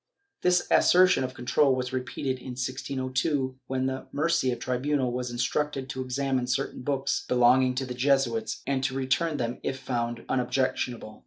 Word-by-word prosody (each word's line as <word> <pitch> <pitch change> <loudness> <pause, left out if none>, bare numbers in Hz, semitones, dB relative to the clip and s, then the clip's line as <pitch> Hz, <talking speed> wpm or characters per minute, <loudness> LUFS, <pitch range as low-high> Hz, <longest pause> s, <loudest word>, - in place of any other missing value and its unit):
This 180 0 +3
assertion 180 -6 +5
of 130 0 -4
control 130 +2 +2
was 125 0 -3
repeated 130 0 -3
in 130 0 -7
1602, 130 +1 -2
when 130 0 -1
the 130 0 -3
Murcia 145 -4 +1
tribunal 130 +2 -1
was 125 0 -3
instructed 135 +3 -1
to 130 - -4
examine 130 0 -1
certain 130 +1 -2
books 135 0 -1
belonging 125 +1 +4
to 130 +1 -1
the 125 - -5
Jesuits 125 -4 +1
and 135 -1 0
to 135 0 -1
return 135 +4 0
them 120 -1 -3
if 135 - -3
found 120 -2 -3
unobjectionable. 125 -3 -1
130 Hz, 155 wpm, -27 LUFS, 125-135 Hz, -, assertion